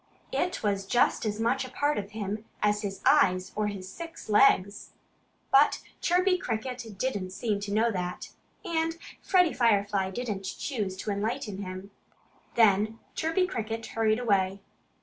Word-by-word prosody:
It 360 Hz, -8 st, -1 dB
was 200 Hz, -2 st, 0 dB
just 240 Hz, 0 st, +2 dB
as 210 Hz, 0 st, -2 dB
much 230 Hz, +3 st, +1 dB
a 255 Hz, -, -7 dB
part 290 Hz, +2 st, 0 dB
of 200 Hz, -1 st, -6 dB
him 210 Hz, 0 st, -4 dB, 0.2 s
as 210 Hz, 0 st, +2 dB
his 195 Hz, -2 st, -5 dB
eyes 185 Hz, 0 st, +4 dB
or 210 Hz, 0 st, 0 dB
his 195 Hz, -3 st, -5 dB
six 330 Hz, -, -9 dB
legs. 205 Hz, -3 st, +3 dB, 0.6 s
But 280 Hz, +2 st, +5 dB, 0.2 s
Chirpy 365 Hz, +1 st, +3 dB
Cricket 230 Hz, -, -4 dB
didn't 200 Hz, -5 st, -2 dB
seem 205 Hz, +2 st, -2 dB
to 200 Hz, 0 st, -5 dB
know 225 Hz, +3 st, +3 dB
that. 180 Hz, -3 st, -4 dB, 0.3 s
And 330 Hz, 0 st, -1 dB, 0.2 s
Freddie 360 Hz, -4 st, +3 dB
Firefly 205 Hz, -5 st, +2 dB
didn't 200 Hz, -2 st, -4 dB
choose 210 Hz, -9 st, -3 dB
to 210 Hz, -, -3 dB
enlighten 210 Hz, 0 st, -2 dB
him. 185 Hz, 0 st, -7 dB, 0.6 s
Then 215 Hz, -1 st, +4 dB, 0.2 s
Chirpy 325 Hz, +4 st, +1 dB
Cricket 225 Hz, -7 st, -4 dB
hurried 220 Hz, -1 st, +1 dB
away. 200 Hz, -5 st, +1 dB
215 Hz, 150 wpm, -28 LUFS, 200-250 Hz, 0.6 s, But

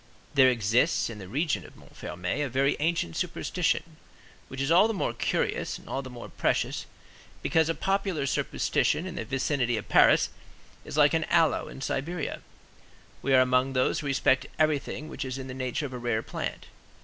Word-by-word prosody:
There 135 Hz, -3 st, +6 dB
exists 120 Hz, +4 st, +2 dB
in 110 Hz, -, -9 dB
the 95 Hz, -, -8 dB
region 135 Hz, -, -1 dB
of -, -, -14 dB
Montfermeil 90 Hz, +11 st, -4 dB
a 140 Hz, -, -2 dB
very 135 Hz, +3 st, +2 dB
ancient 155 Hz, -, 0 dB
superstition, -, -, -1 dB, 0.5 s
which 130 Hz, -, -8 dB
is 135 Hz, +3 st, 0 dB
all 185 Hz, +6 st, +6 dB
the 225 Hz, -, -2 dB
more -, -, -1 dB
curious -, -, -1 dB
and -, -, -17 dB
all 135 Hz, -, -2 dB
the 130 Hz, -, -9 dB
more 120 Hz, -1 st, -9 dB
precious, -, -, -1 dB, 0.6 s
because 160 Hz, -1 st, +2 dB
a 165 Hz, -, 0 dB
popular 195 Hz, -6 st, 0 dB
superstition 150 Hz, +4 st, 0 dB
in 185 Hz, -, -5 dB
the 115 Hz, -, -4 dB
vicinity 130 Hz, -1 st, 0 dB
of 105 Hz, -, -6 dB
Paris -, -, +5 dB, 0.5 s
is -, -, -6 dB
like 150 Hz, 0 st, +5 dB
an 160 Hz, -1 st, +1 dB
aloe 165 Hz, -2 st, +2 dB
in 135 Hz, -, -10 dB
Siberia. 150 Hz, +5 st, -3 dB, 0.8 s
We 135 Hz, 0 st, +3 dB
are 130 Hz, -, +7 dB
among 130 Hz, +1 st, +2 dB
those 130 Hz, -1 st, +1 dB
who 145 Hz, -, -4 dB
respect 135 Hz, 0 st, +2 dB
everything 155 Hz, -1 st, 0 dB
which 145 Hz, -3 st, -5 dB
is 130 Hz, 0 st, -4 dB
in 135 Hz, -, -6 dB
the 130 Hz, -, -6 dB
nature 130 Hz, +3 st, -2 dB
of 130 Hz, -, -6 dB
a 125 Hz, -, -5 dB
rare 120 Hz, -2 st, -1 dB
plant. -, -, -5 dB
135 Hz, 185 wpm, -28 LUFS, 125-155 Hz, 0.8 s, are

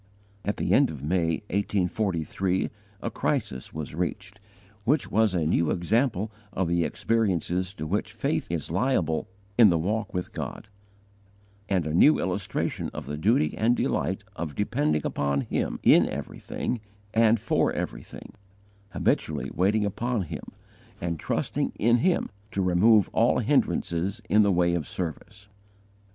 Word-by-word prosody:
At 105 Hz, +3 st, -2 dB
the -, -, 0 dB
end 140 Hz, -1 st, +5 dB
of 70 Hz, -3 st, -7 dB
May, 80 Hz, +2 st, 0 dB
1843, 95 Hz, -2 st, 0 dB, 0.3 s
a -, -, -2 dB
crisis 65 Hz, -1 st, -2 dB
was 75 Hz, -2 st, -6 dB
reached, 95 Hz, +4 st, -4 dB, 0.4 s
which 140 Hz, +6 st, +1 dB
was 110 Hz, -2 st, +3 dB
a 85 Hz, -3 st, +1 dB
new 85 Hz, 0 st, +2 dB
example 110 Hz, +3 st, +1 dB, 0.2 s
of 95 Hz, -2 st, -1 dB
the 85 Hz, 0 st, +2 dB
experiences 95 Hz, -5 st, 0 dB
to 80 Hz, -, -5 dB
which 100 Hz, +7 st, -1 dB
faith -, -, -1 dB
is 85 Hz, -2 st, -3 dB
liable 90 Hz, -, +1 dB, 0.3 s
in 110 Hz, -3 st, +9 dB
the 85 Hz, -, +3 dB
walk 105 Hz, +5 st, -1 dB
with 90 Hz, -1 st, -4 dB
God; -, -, -6 dB, 1.0 s
and 95 Hz, -5 st, +1 dB
a 75 Hz, -, -2 dB
new 145 Hz, -, +6 dB
illustration 95 Hz, 0 st, -2 dB
of -, -, -5 dB
the 75 Hz, -, -4 dB
duty 80 Hz, -1 st, +2 dB
and 120 Hz, +3 st, +2 dB
delight -, -, -1 dB
of 80 Hz, -4 st, -5 dB
depending 75 Hz, 0 st, 0 dB
upon 70 Hz, -1 st, 0 dB
Him -, -, -2 dB
in -, -, +6 dB
everything 120 Hz, -3 st, -4 dB, 0.3 s
and 115 Hz, 0 st, +4 dB
for 115 Hz, -, +1 dB
everything, -, -, -6 dB, 0.6 s
habitually -, -, 0 dB
waiting 105 Hz, +4 st, +2 dB
upon 115 Hz, +2 st, -1 dB
Him, 80 Hz, -, -7 dB, 0.5 s
and 85 Hz, -2 st, -3 dB
trusting -, -, -1 dB
in 120 Hz, +2 st, +4 dB
Him 175 Hz, +1 st, +1 dB, 0.2 s
to 95 Hz, -, 0 dB
remove 95 Hz, +3 st, +5 dB
all -, -, +3 dB
hindrances 90 Hz, +6 st, 0 dB
in 105 Hz, 0 st, +5 dB
the 100 Hz, -1 st, +4 dB
way 85 Hz, -1 st, +2 dB
of 85 Hz, -4 st, -2 dB
service. 100 Hz, +4 st, -6 dB
95 Hz, 145 wpm, -26 LUFS, 85-110 Hz, 1.0 s, in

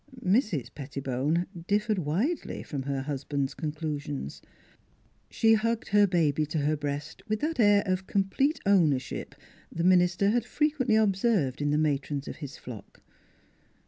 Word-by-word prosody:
Mrs. 190 Hz, -, +1 dB
Pettibone 140 Hz, +3 st, -2 dB, 0.2 s
differed 210 Hz, 0 st, +1 dB
widely 190 Hz, -, -2 dB
from 140 Hz, -3 st, -4 dB
her 135 Hz, 0 st, -2 dB
hus 140 Hz, -1 st, -4 dB
band's 140 Hz, -1 st, -2 dB
conclusions. 150 Hz, -, -4 dB, 0.9 s
She 225 Hz, 0 st, +3 dB
hugged 230 Hz, +1 st, 0 dB
her 205 Hz, 0 st, +5 dB
baby 155 Hz, -4 st, +1 dB
to 155 Hz, -, -3 dB
her 150 Hz, +1 st, +1 dB
breast 145 Hz, +1 st, -5 dB
with 215 Hz, 0 st, -1 dB
that 310 Hz, -1 st, -2 dB
air 205 Hz, -2 st, +5 dB
of 185 Hz, -1 st, -1 dB
complete 235 Hz, +10 st, +1 dB
ownership 160 Hz, -10 st, +1 dB, 0.4 s
the 165 Hz, -, -3 dB
minister 180 Hz, +2 st, +4 dB
had 240 Hz, 0 st, +1 dB
frequently 280 Hz, -3 st, +1 dB
observed 195 Hz, -, +2 dB
in 145 Hz, -, +1 dB
the 150 Hz, -, +2 dB
matrons 145 Hz, -1 st, -1 dB
of -, -, -6 dB
his 145 Hz, -4 st, -8 dB
flock. 110 Hz, -5 st, -11 dB
170 Hz, 145 wpm, -28 LUFS, 145-210 Hz, 0.9 s, her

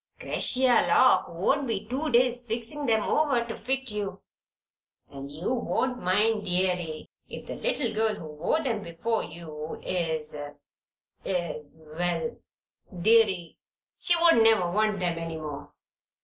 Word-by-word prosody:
'Cretia 255 Hz, -2 st, +3 dB
Lock 255 Hz, -, +5 dB
won't 265 Hz, -, 0 dB
be 220 Hz, -4 st, -2 dB
two 275 Hz, +6 st, -2 dB
days 245 Hz, 0 st, +3 dB
fixin' 240 Hz, +4 st, -3 dB
'em 220 Hz, -1 st, +3 dB
over 275 Hz, -6 st, +1 dB
to 230 Hz, -, -6 dB
fit 265 Hz, 0 st, -3 dB
you. 200 Hz, -2 st, -4 dB, 0.9 s
And 140 Hz, 0 st, -8 dB
you 165 Hz, -, -3 dB
won't 250 Hz, +1 st, -1 dB
mind, 210 Hz, +4 st, +2 dB
deary, 180 Hz, -3 st, -1 dB, 0.2 s
if -, -, -8 dB
the -, -, -6 dB
little 290 Hz, -, -1 dB
girl 220 Hz, 0 st, +1 dB
who 165 Hz, -, -9 dB
wore 175 Hz, -, 0 dB
them 230 Hz, -6 st, -1 dB
before 200 Hz, +6 st, -2 dB
you 155 Hz, -1 st, -8 dB
is 160 Hz, -4 st, -1 dB, 0.9 s
is 160 Hz, -3 st, -3 dB
Well, 175 Hz, +5 st, -1 dB, 0.6 s
deary, 195 Hz, -4 st, +3 dB, 0.4 s
she 345 Hz, -, +4 dB
won't 335 Hz, -7 st, +5 dB
never 220 Hz, -6 st, +4 dB
want 210 Hz, +1 st, +1 dB
them 175 Hz, -2 st, -1 dB
any 165 Hz, -1 st, -5 dB
more." 145 Hz, -2 st, -7 dB
210 Hz, 135 wpm, -27 LUFS, 170-240 Hz, 0.9 s, Lock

